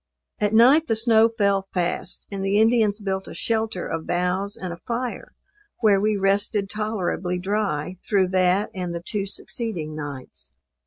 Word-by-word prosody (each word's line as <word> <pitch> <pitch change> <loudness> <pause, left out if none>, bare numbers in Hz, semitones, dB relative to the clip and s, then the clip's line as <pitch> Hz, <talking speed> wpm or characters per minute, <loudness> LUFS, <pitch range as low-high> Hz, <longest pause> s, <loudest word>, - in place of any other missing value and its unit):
At 210 +1 +1
night 270 +8 +6
the 225 - +1
snow 225 0 +4
fell 200 -3 +1
fast, 180 +1 0
and 195 -1 -4
the 195 +2 +2
Indians 220 -2 +3
built 190 -2 -3
a - - -8
shelter 220 -2 -1
of 165 -1 -4
boughs, 180 +3 -1
and 180 -2 -5
a - - -9
fire, 245 +1 -4 0.5
where 205 -4 +4
we 210 0 +1
rested 200 +1 0
tolerably 195 -4 -2
dry 185 -3 -2
through 195 -3 +2
that 185 +3 +2
and 180 -3 -4
the 170 - -5
two 200 -3 -2
succeeding 190 -7 -4
nights. 145 -4 -7
200 Hz, 160 wpm, -23 LUFS, 180-220 Hz, 0.5 s, night